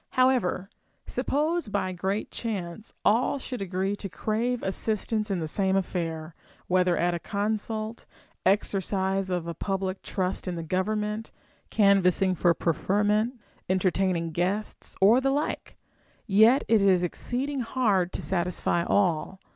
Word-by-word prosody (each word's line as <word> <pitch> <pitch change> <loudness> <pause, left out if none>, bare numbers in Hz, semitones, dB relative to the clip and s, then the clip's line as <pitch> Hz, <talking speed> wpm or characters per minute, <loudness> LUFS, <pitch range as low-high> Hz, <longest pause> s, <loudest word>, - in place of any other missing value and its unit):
However, 255 -8 +2 0.4
suppose 310 -1 -1
by 195 -2 -1
great 190 +4 -2
chance 205 -2 -5
all 235 +6 +3
should 255 -4 -5
agree 190 +1 -1
to 195 - -6
crave 230 +6 -1
assistance 215 +2 -1
in 195 - 0
the 160 - -3
same 190 +4 +1
affair, 165 -4 -2 0.3
whether 180 -1 +2
at 175 +1 +1
a 170 - -2
consult, 215 +3 -3 0.4
exercise 195 0 +1
of 180 -2 -1
a 170 - -4
public 190 +2 -3
trust 185 0 -2
in 180 - -2
the 165 - -4
government, 210 +5 -1 0.4
canvassini^ 195 -2 +3
for 170 0 +3
preferment, 210 - +1 0.3
entertaining 185 -2 +1
guests, 185 +6 -2
or 220 +7 +6
the 270 - +2
like; 285 +3 -2 0.5
yet 220 +6 +5
it 225 -2 +4
is 190 -2 +4
exceeding 260 - -2
hard 215 -7 +1
to - - -4
satisfy 175 -1 0
all. 185 -1 +1
195 Hz, 130 wpm, -27 LUFS, 180-220 Hz, 0.5 s, or